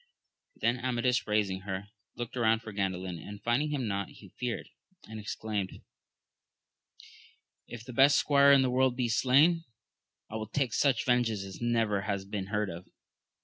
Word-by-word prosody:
Then 120 +2 0
Amadis 125 -1 0
raising 105 -3 +1
her, 95 +1 -5 0.3
looked 120 0 -6
round 115 -2 +2
for 110 - -7
Gan 100 -2 0
dalin, 90 -2 -6
and 100 +3 -9
finding 120 +7 +1
him 135 -5 -2
not, 100 -1 -2
he 100 - -15
feared, 120 +4 -4 0.4
and 110 0 -7
exclaimed. 105 -2 -4 1.9
If 120 -1 -9
the 125 - -8
best 135 +4 +6
squire 140 -1 +5
in 135 -1 +6
the 130 - +1
world 130 0 +2
be 125 -2 -1
slain, 140 +8 +4 0.6
I 110 - -5
will 110 -1 -6
take 130 -2 -1
such 135 -5 +2
vengeance 120 -5 +1
as 95 +2 -9
never 115 -4 +1
has 100 -1 -3
been 100 -1 -4
heard 105 -1 -1
of. 85 +2 -9
115 Hz, 165 wpm, -30 LUFS, 100-125 Hz, 1.9 s, best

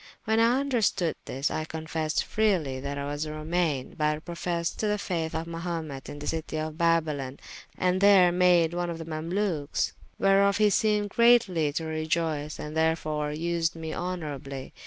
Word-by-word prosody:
When 220 +1 +2
I 240 +4 +4
vnderstoode 220 - +1
this, 135 +2 -2
I 155 - -2
confessed 160 0 -2
freely, 180 -12 +1
that 140 +1 -4
I 140 - -3
was 145 +2 -3
a 150 - -5
Romane, 155 -3 -1
but 150 0 -1
professed 170 0 -3
to 215 - 0
the 210 0 +1
fayth 165 -5 -3
of 160 +1 -2
Mahumet 165 -4 -5
in 145 - -7
the 145 - -7
citie 160 0 -3
of 155 0 -3
Babylon, 155 -5 0 0.4
and 185 +1 +1
there 195 -3 +7
made 175 -2 +4
one 175 0 -1
of 170 - -4
the 165 - -7
Mamalukes; 165 -1 -1 0.3
whereof 195 0 +4
he 210 -1 +4
seemed 210 -1 +1
greatly 230 -11 +4
to 160 - -2
reioyce 155 -1 -2
and 150 +1 -6
therefore 155 -2 0
vsed 170 +2 -1
me 160 -1 -5
honourably. 145 -7 -5
165 Hz, 170 wpm, -27 LUFS, 155-180 Hz, 0.4 s, there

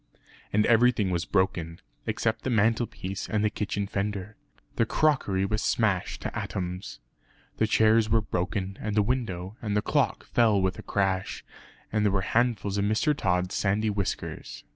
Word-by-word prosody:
And 105 +1 +3
everything 115 -4 +4
was 85 -1 -1
broken, 85 -3 0 0.3
except 110 -1 0
the - - -1
mantelpiece 110 -4 0
and 105 -1 +1
the 105 - +2
kitchen 100 -1 -2
fender. 100 0 -3 0.4
The 115 - +3
crockery 110 -12 +2
was 105 +2 -1
smashed 100 -6 0
to - - -4
atoms. 90 0 -4 0.6
The 110 - +2
chairs 110 0 +4
were 115 - +4
broken, 95 -1 -3
and 105 -1 -2
the 105 - +4
window, 100 -5 -2
and 105 -2 -1
the 105 - +1
clock - - 0
fell 110 -4 +3
with 95 -1 0
a - - -5
crash, 95 -2 -1 0.5
and 110 0 +1
there 105 - +3
were 95 0 +1
handfuls 110 -2 +1
of 100 - +1
Mr. 110 +8 +2
Tod's 90 -6 0
sandy 105 +2 +1
whiskers. 100 -2 -4
105 Hz, 165 wpm, -27 LUFS, 95-110 Hz, 0.6 s, everything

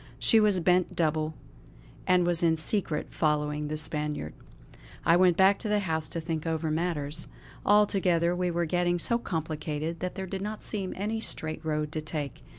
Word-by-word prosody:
She 225 - +4
was 210 -3 +4
bent 180 +1 +2
double, 155 -1 0 0.7
and 180 -1 +4
was 175 -1 +2
in 165 -1 +3
secret 160 -1 -2
following 150 -1 0
the 155 +1 -3
Spaniard. 150 - -2 0.7
I 165 - +6
went 180 -1 +4
back 195 +1 +5
to 220 - -3
the 210 0 +2
house 160 -4 -1
to 165 - -4
think 160 -1 -3
over 160 -1 -1
matters. 160 -2 -2 0.4
Altogether, 185 -4 +3
we 180 0 0
were 170 0 0
getting 175 +1 +1
so 235 +7 +2
complicated 160 -3 -3
that 180 +2 -4
there 190 -1 -4
did 190 +1 -5
not 210 +1 -5
seem 195 -4 -4
any 215 +3 -2
straight 155 -6 -2
road 150 -1 -1
to 155 - -3
take. 150 -3 -5
165 Hz, 175 wpm, -28 LUFS, 155-185 Hz, 0.7 s, I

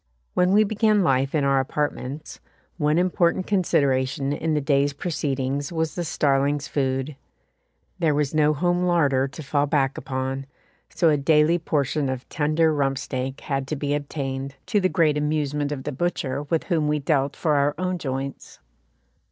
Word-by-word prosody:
When 180 +1 +3
we 210 +2 +6
began 215 -1 +2
life 135 -2 +1
in 150 - +2
our 135 -1 +3
apartments, 145 +1 -3 0.4
one 150 -1 +2
important 180 0 +2
consideration 140 -7 +1
in 155 +1 -1
the - - +2
day's 140 0 +1
proceedings 140 -3 -2
was 160 -2 -1
the 175 - -3
starling's 145 -2 +1
food. 135 0 -1 0.8
There 160 -4 +2
was 145 -1 0
no 155 -1 +4
home 175 +3 +1
larder 145 -7 +2
to 150 +3 -9
fall 145 +1 0
back 140 -2 +1
upon, 135 +1 -4 0.4
so 165 0 +2
a 150 - +3
daily 155 +3 +3
portion 145 -3 0
of 130 -1 -4
tender 155 +1 +2
rump 135 -2 0
steak 130 0 -4
had 135 -2 -2
to 155 - -2
be 145 0 -2
obtained, 140 -2 -4
to 210 - +1
the 185 -1 +2
great 155 -5 +2
amusement 150 -1 -1
of 135 -3 -4
the 150 - -3
butcher 140 -2 -2
with 165 - +1
whom 160 -4 0
we 150 0 +1
dealt 140 -1 0
for 155 - 0
our 145 0 +2
own 185 0 -2
joints. 135 -1 -5
145 Hz, 170 wpm, -24 LUFS, 135-160 Hz, 0.8 s, we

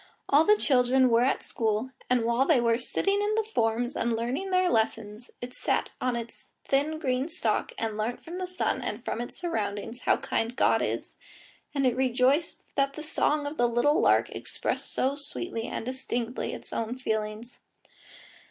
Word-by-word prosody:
All 295 +3 +5
the 420 0 +6
children 260 -4 +3
were 230 +1 +5
at 270 - 0
school, 225 +3 -1 0.2
and 245 -2 +2
while 235 +4 +2
they 310 -7 +5
were 230 0 +2
sitting 395 +10 0
on 415 +1 +1
the 445 - +2
forms 240 - 0
and 230 0 0
learning 250 +12 -2
their 370 -1 +3
lessons, 220 -2 -1
it 245 +1 -6
sat - - -1
on 250 -1 +1
its 235 0 -7 0.2
thin 290 +3 +1
green 260 -2 0
stalk 340 +2 0
and 220 -2 -2
learnt 220 +3 -2
from 345 +2 -6
the 370 - -3
sun 365 0 -1
and 230 +4 -4
from 230 - -2
its 240 - -6
surroundings 225 - -3
how - - +2
kind 230 +2 -2
God - - +3
is, - - -3 0.6
and 275 -1 +2
it 250 -2 +3
rejoiced 260 +5 +1
that 275 0 +1
the 310 - -6
song 300 -1 +1
of 290 +2 -5
the 240 0 +3
little 240 +6 +3
lark - - +3
expressed - - -3
so 270 +2 +1
sweetly 285 -4 -5
and - - -4
distinctly 245 -2 -3
its - - -8
own 230 +2 -2
feelings. 220 -1 -3
250 Hz, 180 wpm, -28 LUFS, 230-290 Hz, 0.6 s, the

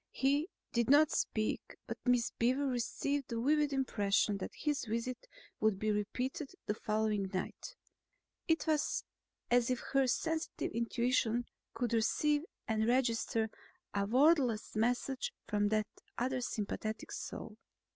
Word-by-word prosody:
He 285 +6 +1 0.2
did 235 0 +2
not 295 +2 +6
speak 215 -1 -1
but - - -5
Miss 245 -2 +3
Beaver 255 +4 +2
received 270 +2 -1
the 230 - -3
vivid 295 +3 +3
impression 205 -6 +1
that - - -3
his 295 -2 -1
visit 235 - -3 0.3
would 215 -3 +3
be 215 +2 0
repeated 250 - -2
the 210 - 0
following 210 -2 0
night; 205 - -4 0.7
it 325 0 +2
was 305 -2 +1 0.5
as 245 0 +4
if 250 -1 +1
her 270 -1 +4
sensitive 320 +5 -1
intuitions 235 0 +1 0.3
could 240 -1 -1
receive 290 +6 +2 0.3
and 220 -1 +1
register 230 -3 +1 0.4
a 200 0 0
wordless 255 -3 +3
message 250 - 0
from 205 -1 +2
that 215 0 +2 0.3
other 255 +1 0
sympathetic 215 -1 -3
soul. 215 -1 -6
240 Hz, 130 wpm, -34 LUFS, 220-275 Hz, 0.7 s, not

